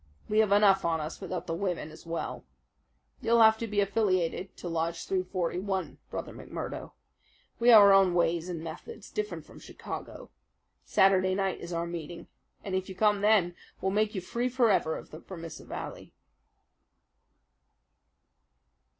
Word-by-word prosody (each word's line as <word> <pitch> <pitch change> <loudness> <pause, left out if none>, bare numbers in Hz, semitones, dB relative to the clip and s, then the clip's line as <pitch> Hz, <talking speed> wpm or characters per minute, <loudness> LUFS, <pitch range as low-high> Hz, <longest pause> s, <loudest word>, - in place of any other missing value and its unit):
We 215 - +2
have 215 -2 +3
enough 200 -1 +5
on 165 -1 +1
us, 155 +4 -6
without 180 -2 -4
the 165 - -3
women 175 -3 -3
as 155 - -14
well. 165 0 -4 0.8
You'll 230 0 +5
have 220 0 +6
to 230 - -3
be 205 -1 +1
affiliated 190 -3 0
to - - -7
Lodge 165 0 -2
341, 185 +1 -2
Brother - - -5
McMurdo. - - -7 0.7
We 235 +1 +4
have 220 -3 +10
our 200 -1 +8
own 190 -2 +5
ways 170 0 +1
and 165 -3 -5
methods, 165 - -9
different 425 0 -4
from - - -14
Chicago. - - -8 0.5
Saturday 190 -1 +3
night 195 -1 -1
is 170 - -8
our 170 0 -1
meeting, 170 -1 -7 0.4
and 195 - -5
if 190 0 -1
you 190 - -7
come 210 0 +2
then, 205 -5 +3 0.2
we'll 190 - 0
make 215 +1 +1
you 190 - -2
free 235 +7 -2
forever 225 -10 +2
of - - -12
the 155 - -9
Vermissa 165 -3 -9
Valley." - - -7
190 Hz, 155 wpm, -29 LUFS, 170-205 Hz, 0.8 s, have